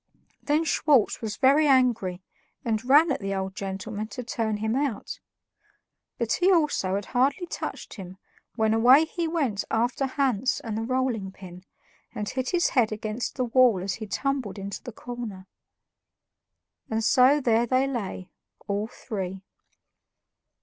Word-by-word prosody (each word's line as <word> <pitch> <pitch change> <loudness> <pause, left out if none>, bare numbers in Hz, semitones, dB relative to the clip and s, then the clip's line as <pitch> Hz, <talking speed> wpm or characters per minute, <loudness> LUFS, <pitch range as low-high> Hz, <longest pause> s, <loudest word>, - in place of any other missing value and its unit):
Then 300 +2 +1
Schwartz 295 -7 +2
was 220 -2 -3
very 285 +3 +4
angry 235 -9 +2 0.4
and 220 -1 0
ran 290 +5 +5
at - - -1
the 195 -1 -3
old 190 0 -3
gentleman 200 +2 -5
to 250 +3 -7
turn 225 -2 -2
him 220 +2 -1
out; 270 -6 -2 1.0
but 230 -2 0
he 365 +2 +3
also 300 - +2
had 200 0 -3
hardly 275 +8 +2
touched - - -6
him 190 -3 -9 0.4
when 220 -1 +2
away 250 +7 +6
he 335 +1 -3
went 280 -11 -1
after 245 +4 0
Hans 260 -3 0
and 225 -2 -5
the 220 - -2
rolling 240 -5 -1
pin, 185 -1 -12 0.5
and 210 - -3
hit 255 +2 -2
his 355 -1 +2
head 235 -5 +2
against 215 +2 -4
the 255 - 0
wall 245 -4 +4
as 190 -1 -2
he 215 - -4
tumbled 265 -1 -2
into 200 0 -6
the 245 - -8
corner. 230 -5 -7 1.4
And 225 0 -1
so 255 +6 +5
there 235 -3 +2
they 255 +3 +2
lay, 205 -8 -5 0.4
all 205 +1 -1
three. 195 -6 -6
230 Hz, 150 wpm, -26 LUFS, 205-265 Hz, 1.4 s, away